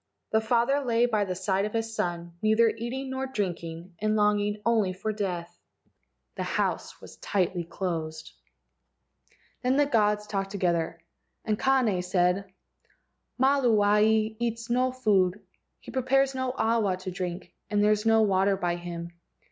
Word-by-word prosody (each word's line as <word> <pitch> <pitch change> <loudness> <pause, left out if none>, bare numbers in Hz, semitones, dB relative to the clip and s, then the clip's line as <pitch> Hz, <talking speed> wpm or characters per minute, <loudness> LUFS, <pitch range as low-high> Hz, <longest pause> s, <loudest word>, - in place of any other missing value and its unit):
The 220 - +3
father 240 +5 +2
lay 235 -1 +2
by 215 -4 +1
the 185 -1 -3
side 190 +1 0
of 210 - -5
his 225 0 -2
son, 175 -4 -3
neither 220 +1 +4
eating 250 +4 -4
nor 265 0 -3
drinking, 175 -6 -4
and 215 +1 +1
longing 210 0 +2
only 220 -5 +2
for 215 +4 -3
death. 175 -4 -4 0.7
The - - -5
house - - -2
was - - -13
tightly 180 -3 -1
closed. 160 -3 -4 1.3
Then 255 +2 +2
the 290 - +4
gods 210 -5 +2
talked 195 -2 -3
together, 175 -4 -1 0.5
and 215 -1 0
Kane 250 -9 +2
said: 180 +1 0 0.9
"Maluae 220 -5 +3
eats 230 0 -3
no 255 +1 +2
food, 205 -6 +2 0.4
he - - -11
prepares 270 +1 +2
no 260 -1 -2
awa 220 -5 +1
to 185 0 -6
drink, 180 0 -5 0.2
and 205 -1 +2
there 210 - +4
is 210 0 +1
no 225 0 +4
water 195 -1 +2
by 175 -2 -1
him. 170 -1 -6
210 Hz, 150 wpm, -27 LUFS, 185-230 Hz, 1.3 s, neither